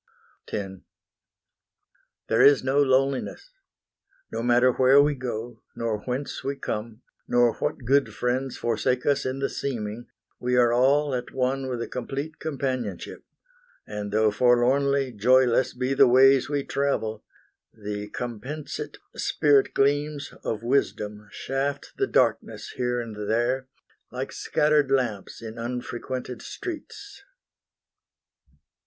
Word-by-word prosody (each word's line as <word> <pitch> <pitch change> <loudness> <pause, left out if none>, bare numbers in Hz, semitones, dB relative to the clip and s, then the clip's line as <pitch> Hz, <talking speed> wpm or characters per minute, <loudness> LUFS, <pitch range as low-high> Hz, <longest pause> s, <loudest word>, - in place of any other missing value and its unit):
X 95 -2 -4 1.5
There - - +3
is 140 -2 +6
no 135 +2 +2
loneliness: 135 - 0 0.8
no - - -3
matter 120 +1 +4
where 130 +3 +5
We 145 +1 +4
go, 120 -3 -5
nor 115 -2 -2
whence 130 +5 -4
we 140 +1 -2
come, 110 -2 -5 0.2
nor 120 -1 +3
what 125 - -3
good 140 +3 +3
friends 130 +2 -2
Forsake 120 +2 0
us 140 -2 +1
in 130 +1 -2
the 135 0 0
seeming, 120 -3 -4 0.3
we 125 0 0
are 120 -1 +4
all 140 +3 +3
At 125 -1 -3
one 130 +1 -1
with 125 -2 -3
a - - -6
complete 140 +5 -5
companionship; 130 - -4 0.6
And 105 -1 -5
though 110 0 +3
forlornly 130 +4 +3
joyless 125 +3 +3
be 130 +2 -1
the 135 - +6
ways 135 +2 +5
We 145 -1 -1
travel, 135 -7 -1 0.5
the 105 -1 -6
compensate 125 +7 -6 0.2
spirit 145 -2 +2
gleams 145 +1 0
Of 110 0 -3
Wisdom 105 -5 -1
shaft 135 +5 -3
the 400 - +1
darkness - - 0
here 125 -1 -1
and 105 -3 -5
there, 125 +4 0 0.4
Like - - -4
scattered 150 -2 +2
lamps 120 -6 -1
in 110 0 -7
unfrequented 125 +1 -5
streets. 395 +4 -8
125 Hz, 125 wpm, -25 LUFS, 115-140 Hz, 1.5 s, is